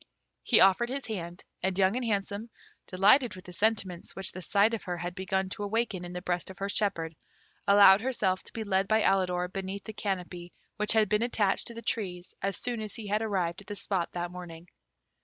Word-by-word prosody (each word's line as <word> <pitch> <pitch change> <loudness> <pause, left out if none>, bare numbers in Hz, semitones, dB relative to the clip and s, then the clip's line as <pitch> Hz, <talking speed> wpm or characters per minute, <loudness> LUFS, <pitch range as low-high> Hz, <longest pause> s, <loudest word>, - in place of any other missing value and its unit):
He 235 - +4
offered 195 +5 +5
his 275 +1 -3
hand, 175 -5 -6 0.2
and 190 -1 -1
Young 195 +2 +3
and 255 - -1
Handsome, 205 0 -2 0.4
delighted 210 +6 +4
with 185 - -12
the 180 - -10
sentiments 195 -4 -1
which 190 -1 -4
the 185 - -8
sight 200 +5 +3
of 225 - -2
her 175 -2 -3
had 175 +1 -4
begun 190 +1 -1
to 205 - -5
awaken 205 -3 -1
in 175 - -7
the 180 0 -6
breast 175 -1 -1
of 190 - -10
her 195 0 -3
shepherd, 170 -6 0 0.5
allowed 200 0 +8
herself 210 -7 0
to - - -11
be 225 - -4
led 195 -1 +1
by 220 +1 +3
Alidor 180 -2 +2
beneath 195 +2 -5
the 220 - -7
canopy 180 -4 -4 0.2
which 210 0 +3
had 220 -1 +4
been 210 +2 +1
attached 215 -5 +1
to 235 - -8
the 230 - -8
trees 180 -5 -3
as 195 -1 -1
soon 240 -2 -3
as 215 -1 -5
he 225 - -7
had 210 +2 +1
arrived 190 -5 -1
at 200 - -17
the 205 - -5
spot 190 -4 -1
that 175 0 -3
morning. 175 -1 -10
195 Hz, 215 wpm, -29 LUFS, 180-215 Hz, 0.5 s, allowed